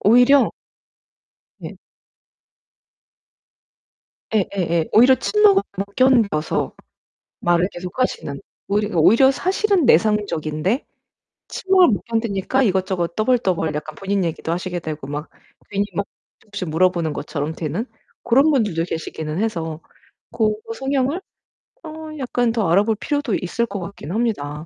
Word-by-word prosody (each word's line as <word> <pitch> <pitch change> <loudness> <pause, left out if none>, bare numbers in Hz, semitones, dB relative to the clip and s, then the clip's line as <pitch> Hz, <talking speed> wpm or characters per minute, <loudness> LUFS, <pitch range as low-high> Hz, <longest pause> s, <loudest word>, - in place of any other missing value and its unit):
오히려 245 +6 +5 1.1
예. - - -8 2.6
예예예. 180 -5 0
오히려 250 +4 +7
침목을 405 - +4 0.2
못 200 +1 -4
견뎌서 230 -12 +2 0.7
말을 175 +2 +2
계속하시는 180 - -3 0.3
오히려 205 -1 0
오히려 225 - +6
사실은 375 +1 +1
내상적인데 205 - +1 0.6
침묵을 375 -2 +3
못 205 - 0
견디니까 230 +1 0
이것저것 185 -5 0
떠벌떠벌 195 -9 +1
약간 150 0 -5
본인 195 -1 -1
얘기도 165 0 -3
하시게 180 0 -3
되고 155 -3 -6
막 145 +2 -5 0.4
괜히 200 0 0
막 200 - -2 0.3
조금씩 205 -4 -6
물어보는 170 0 +1
것처럼 150 +1 -4
되는 165 - -3 0.4
고런 270 +6 +4
분들도 210 - +1
계시기는 160 -1 -5
해서 165 -7 -2 0.5
고 215 -1 0
성향을 270 +5 -1 0.6
어 315 - -8 0.3
약간 245 -2 0
더 225 -6 0
알아볼 205 +6 +3
필요도 285 -3 -1
있을 210 +6 -1
것 200 -3 -6
같긴 175 -3 -8
합니다. 165 -9 -2
200 Hz, 280 characters per minute, -21 LUFS, 165-245 Hz, 2.6 s, 오히려